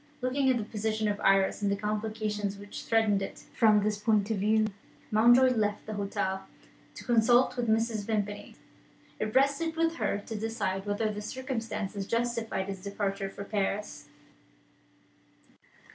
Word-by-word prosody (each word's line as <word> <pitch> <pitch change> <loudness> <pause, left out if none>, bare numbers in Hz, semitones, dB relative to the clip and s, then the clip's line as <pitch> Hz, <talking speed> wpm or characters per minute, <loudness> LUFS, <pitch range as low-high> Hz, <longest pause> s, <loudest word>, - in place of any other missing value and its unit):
Looking 260 +2 +1
at 255 - +3
the 225 - -2
position 220 0 -2
of 205 0 -1
Iris, 195 +1 +3
and 200 -1 +1
at 200 - 0
the - - -16
complications 210 -1 -2
which 205 0 -9
threatened 220 -3 +2
it, 195 - -6
from 210 -2 +4
this 210 0 0
point 215 -1 +2
of 220 - 0
view, 215 +2 +3 0.5
Mountjoy 240 +4 +6
left 210 -2 -1
the 215 - -5
hotel 190 -1 -2 0.5
to - - -9
consult 240 +1 +4
with 245 -1 -1
Mrs. 220 -1 +1
Vimpany. 205 -2 -3 0.6
It 215 0 -3
rested 280 +5 +2
with 330 0 +1
her - - 0
to 215 +2 -7
decide 210 -3 -2
whether 215 +1 0
the 210 0 -5
circumstances 220 -5 -4
justified 230 -4 -1
his 195 -1 -6
departure 200 0 -3
for 200 - -8
Paris. 200 -7 -3
215 Hz, 155 wpm, -29 LUFS, 200-230 Hz, 0.6 s, Mountjoy